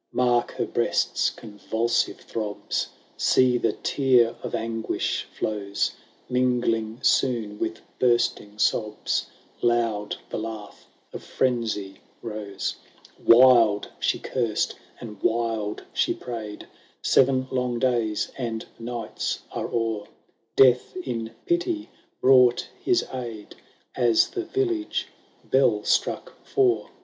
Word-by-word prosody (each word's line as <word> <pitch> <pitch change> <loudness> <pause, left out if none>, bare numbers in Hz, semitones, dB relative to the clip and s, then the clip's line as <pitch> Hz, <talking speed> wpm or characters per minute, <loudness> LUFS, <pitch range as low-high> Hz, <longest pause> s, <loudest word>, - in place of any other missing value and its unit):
Mark 120 -1 +2
her - - -1
breast's - - +1
convulsive 110 +2 -1
throbs! 105 -2 -3 0.3
See, 125 -1 +4
the 115 -3 +1
tear 125 -4 +3
of - - -4
anguish 115 0 -2
flows! 100 -2 -1 0.2
— - - -34
Mingling 120 -2 0
soon 110 -5 +1
with 110 0 -3 0.2
bursting 120 -4 +1
sobs, 105 0 0 0.3
Loud 115 -3 +1 0.2
the - - -2
laugh 110 -2 -7 0.3
of - - -6
frenzy 115 -6 -1 0.2
rose. 105 -4 -4 0.5
"Wild 115 -4 +6
she - - +1
cursed 115 -5 -1 0.3
and 105 -4 -9
wild 110 -2 -1
she - - +1
prayed: 110 -4 -7 0.4
Seven 130 0 +3
long 125 -2 0
days 115 -4 0
and 115 -3 -3
nights 115 -2 -4
are - - -3
o'er; 115 -3 -2 0.5
Death 125 +5 +5
in 120 -10 -3 0.2
pity 345 -2 0 0.3
brought 125 -2 +5 0.2
his 365 -1 +2
aid, 115 -5 -6 0.4
As 120 -3 +4
the 365 -2 -3
village 355 -3 -1 0.4
bell - - +3
struck - - -1
four. 390 -2 +1
115 Hz, 110 wpm, -25 LUFS, 110-125 Hz, 0.5 s, Wild